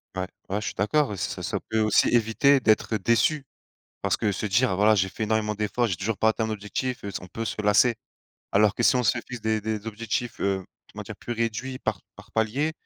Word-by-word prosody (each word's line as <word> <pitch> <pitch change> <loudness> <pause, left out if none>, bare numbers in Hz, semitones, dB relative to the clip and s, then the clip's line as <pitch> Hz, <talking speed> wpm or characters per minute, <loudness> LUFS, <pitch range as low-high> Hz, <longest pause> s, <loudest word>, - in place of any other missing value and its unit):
Ouais, 95 0 -2 0.2
ouais, 100 +2 0
je - - -5
suis - - -3
d'accord. 145 +9 +2
Oui, 105 - -5
ça, - - -3
ça - - -2
peut 110 - +1
aussi 110 -1 +4
éviter 120 +4 +4
d'être 110 -1 +2
déçu 115 +8 +2 0.6
parce - - +1
que 105 - 0
se 95 - -3
dire: 105 +1 +2
«Voilà, 105 +3 +5
j'ai 95 -2 +2
fait 95 +4 -5
énormément 105 0 0
d'efforts, 105 +3 0
j'ai 95 - -1
toujours 100 +4 -2
pas 110 - +3
atteint 110 0 0
mon 110 - -3
objectif», 110 +5 -4
heu, 100 - -4
on 90 - -10
peut 115 +5 -5
se 105 - -3
lasser. 105 +4 +4 0.6
Alors 105 0 +4
que - - -2
si 125 - +5
on 125 - +1
se - - +3
fixe 125 -2 -7
des 110 0 0
des 110 0 -4
objectifs, 115 +2 -3
heu, 95 -1 0 0.3
comment - - -6
dire? - - -7
Plus 120 - -6
réduits 120 +3 -2
par 95 -7 -2 0.2
par 105 +2 -15
palier, 125 +8 0
110 Hz, 235 wpm, -26 LUFS, 105-120 Hz, 0.6 s, Voilà